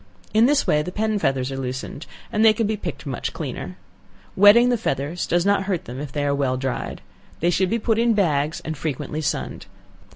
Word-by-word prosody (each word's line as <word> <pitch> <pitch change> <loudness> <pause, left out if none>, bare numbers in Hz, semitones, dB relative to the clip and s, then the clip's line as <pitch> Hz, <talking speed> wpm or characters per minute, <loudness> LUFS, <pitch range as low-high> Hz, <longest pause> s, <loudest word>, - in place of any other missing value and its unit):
In 220 +3 +5
this 285 0 +2
way 150 - +3
the 180 - -5
pen 215 +1 0
feathers 135 -4 0
are 135 - -4
loosened, 130 +3 -5 0.2
and 215 -1 +2
they 220 -1 +7
can 225 +1 0
be 215 +1 0
picked 210 - -6
much - - -4
cleaner. - - -6 0.6
Wetting 210 +5 +7
the 245 - +3
feathers 145 -2 -2
does 175 +1 +1
not 200 -1 +2
hurt 190 -4 -2
them 125 +2 -7
if 145 -2 -6
they 145 +1 -2
are 140 - +1
well 135 -2 0
dried. 130 -1 -4 0.4
They 175 +2 +2
should 185 +2 +1
be 230 - +1
put 225 0 0
in 235 -1 +3
bags, 155 -6 +1
and 160 - -3
frequently 150 +1 -4
sunned. 145 - -3
175 Hz, 215 wpm, -23 LUFS, 140-215 Hz, 0.6 s, they